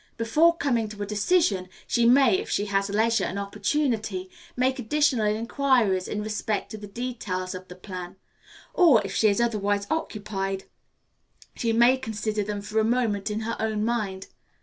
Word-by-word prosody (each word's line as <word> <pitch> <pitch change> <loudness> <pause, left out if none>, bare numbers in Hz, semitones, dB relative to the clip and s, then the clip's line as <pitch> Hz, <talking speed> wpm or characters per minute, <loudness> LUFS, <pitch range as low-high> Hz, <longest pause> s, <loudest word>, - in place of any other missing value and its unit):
Before 310 +9 +3
coming 235 -8 0
to 210 -1 -6
a - - -3
decision, 205 - +1 0.2
she 235 -1 +2
may, 245 -5 +5
if - - -6
she 205 - 0
has 200 0 0
leisure 225 +3 +2
and 185 - -4
opportunity, 270 - -1 0.3
make 260 +2 +1
additional 250 -2 +2
inquiries 225 -3 +1
in 210 0 -3
respect 215 0 -2
to 215 - -6
the 205 - -8
details 200 -5 -4
of 185 0 -8
the 180 - -10
plan; 185 -1 -8 0.6
or, 320 -11 +6
if 195 - -5
she 220 - +3
is 200 0 +2
otherwise 205 -3 0
occupied, 195 -9 -3 0.9
she 230 - 0
may 240 +3 +5
consider 215 -3 -3
them 205 0 -4
for 215 +2 -1
a - - +3
moment 220 -3 0
in 210 +1 -2
her 230 +1 -3
own 215 -1 -1
mind. 205 -5 -2
215 Hz, 170 wpm, -26 LUFS, 200-240 Hz, 0.9 s, or